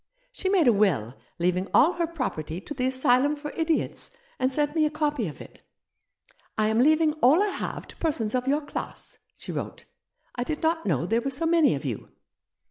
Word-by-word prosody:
She 400 -6 -3
made 370 -7 +3
a 240 - +6
will 165 - +1 0.2
leaving 180 +2 0
all 335 +6 +6
her 340 -1 -1
property 175 - -4
to 295 - -8
the 255 -2 -1
Asylum 260 +2 +3
for 295 0 -7
Idiots, 325 -1 -1 0.3
and 260 +1 +1
sent 295 +2 0
me 315 -2 +3
a - - -2
copy 295 - -1
of 150 - -8
it. - - -13 0.5
' - - -35
I 215 0 +2
am 220 +1 +1
leaving 310 +3 +4
all 300 +11 +6
I 420 - 0
have - - -5
to - - -11
persons 245 -10 -1
of 255 0 -1
your 290 +3 +2
class,' 290 - -7 0.2
she - - -7
wrote; - - -6 0.3
' - - -34
I - - +1
did 300 +5 -4
not 325 -3 +1
know 155 -5 +1
there 225 +5 +1
were 275 - -2
so 275 +5 -1
many 325 -2 +4
of - - -6
you.' - - -4
280 Hz, 215 wpm, -26 LUFS, 225-315 Hz, 0.5 s, a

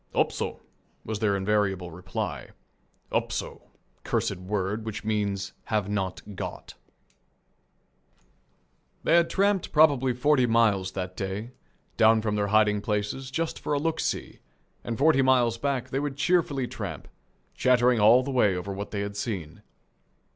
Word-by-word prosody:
"Upso," - - -1 0.4
was 110 -1 -3
their 100 -2 +1
invariable 95 -3 0
reply. 90 +2 -5 0.6
"Upso," - - -3 0.3
cursed - - -1
word, 100 +3 -2
which 110 0 -5
means 100 -3 -1
"Have 105 -3 -1
not 100 0 -3
got." - - -6 2.3
They - - +2
had 170 -1 +4
tramped 200 -1 +1
probably 140 -5 +4
forty 130 0 +3
miles 105 -5 +2
that 90 -1 -4
day, 100 +5 -4 0.5
down 110 0 +5
from 105 -2 0
their 105 -1 0
hiding 105 0 +3
places, 105 +5 -2
just 165 +5 -2
for - - -2
a - - +2
"look 165 +2 -1
see," - - -3 0.4
and 115 -1 -4
forty 145 -1 +4
miles 125 -3 +3
back 140 -2 -2
they 135 - 0
would 145 -1 -3
cheerfully 145 -5 +1
tramp, - - -6 0.5
chattering 125 -1 +3
all 115 +5 +6
the 135 - -4
way 105 -7 +3
over 100 +2 -4
what 100 +1 -5
they 100 - -3
had 100 0 -4
seen. 95 -7 -5
110 Hz, 140 wpm, -27 LUFS, 100-130 Hz, 2.3 s, all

